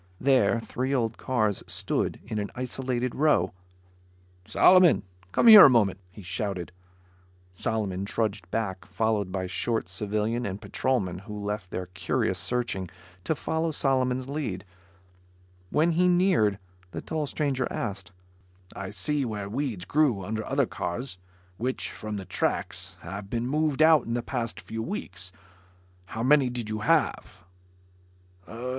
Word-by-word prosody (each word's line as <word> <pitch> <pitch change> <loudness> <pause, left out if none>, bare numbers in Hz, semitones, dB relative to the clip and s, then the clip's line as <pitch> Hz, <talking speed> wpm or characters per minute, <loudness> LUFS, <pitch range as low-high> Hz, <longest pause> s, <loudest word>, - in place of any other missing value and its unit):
There, 125 -4 +3
three 130 +4 -2
old 115 -3 -1
cars 110 -6 0
stood - - -1
in 110 -1 -3
an 105 - -3
isolated 125 0 -2
row. 145 - +2 0.9
"Solomon, 185 -3 +6 0.3
come - - +2
here 215 -3 +12
a - - +9
moment," 105 -7 +3
he 100 +2 -12
shouted. 90 -1 -3 0.8
Solomon 95 -1 -2
trudged 100 -3 -2
back, 95 -4 -3
followed 100 -1 0
by 95 -1 -2
the - - -3
short 115 +4 -1
civilian 110 +3 -2
and 100 -3 -4
patrolman 100 -11 -1
who 105 +2 -8
left 100 -2 -4
their 90 - -4
curious 90 +1 -1
searching 115 -7 -2 0.4
to 160 - +1
follow 160 +3 -1
Solomon's 130 -3 0
lead. 130 -10 -4 1.0
When 160 +3 +3
he 180 +2 +3
neared, 175 - +3 0.3
the - - -6
tall 155 -2 -3
stranger 135 -4 -1
asked, 95 -5 -4 0.6
"I 95 - -5
see 150 +4 -1
where 105 -5 -4
weeds 115 -6 -3
grew 135 -11 +2
under 110 +2 -3
other - - +2
cars 90 +1 -4 0.4
which, 130 +3 -2
from 105 -1 -5
the 95 - -6
tracks, 90 - -2
have 100 0 -7
been 120 +1 -1
moved 155 +1 +2
out 160 -4 +5
in 115 - -1
the 120 - -2
past 120 -4 -3
few 110 0 -6
weeks. 100 - -5 0.8
How 115 - -4
many 135 0 +5
did 120 -3 -4
you 110 - -2
have?" 150 - 0
115 Hz, 140 wpm, -27 LUFS, 100-135 Hz, 1.0 s, here